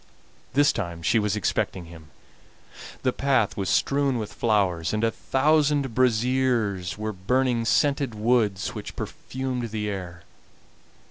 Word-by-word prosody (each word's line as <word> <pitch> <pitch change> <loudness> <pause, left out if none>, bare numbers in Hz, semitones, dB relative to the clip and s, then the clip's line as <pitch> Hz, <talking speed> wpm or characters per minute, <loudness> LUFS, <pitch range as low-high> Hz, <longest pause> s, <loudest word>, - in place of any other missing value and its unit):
This 145 +1 +4
time 85 -5 -5
she 110 +7 +3
was 105 -1 0
expecting 95 -3 -1
him, 80 -2 -13 0.9
the 130 - +1
path 135 -6 +1
was 95 -2 -2
strewn 140 -2 +2
with 110 -3 -5
flowers, 95 -7 +1
and 105 - -1
a 115 - +3
thousand 145 0 +1
braziers 115 -7 +1
were 110 0 -3
burning 120 +5 0
scented 140 -1 +1
woods 105 -3 +1
which - - -8
perfumed 130 -2 -4
the 105 -1 -3
air. 90 -4 -6
115 Hz, 130 wpm, -25 LUFS, 100-130 Hz, 0.9 s, This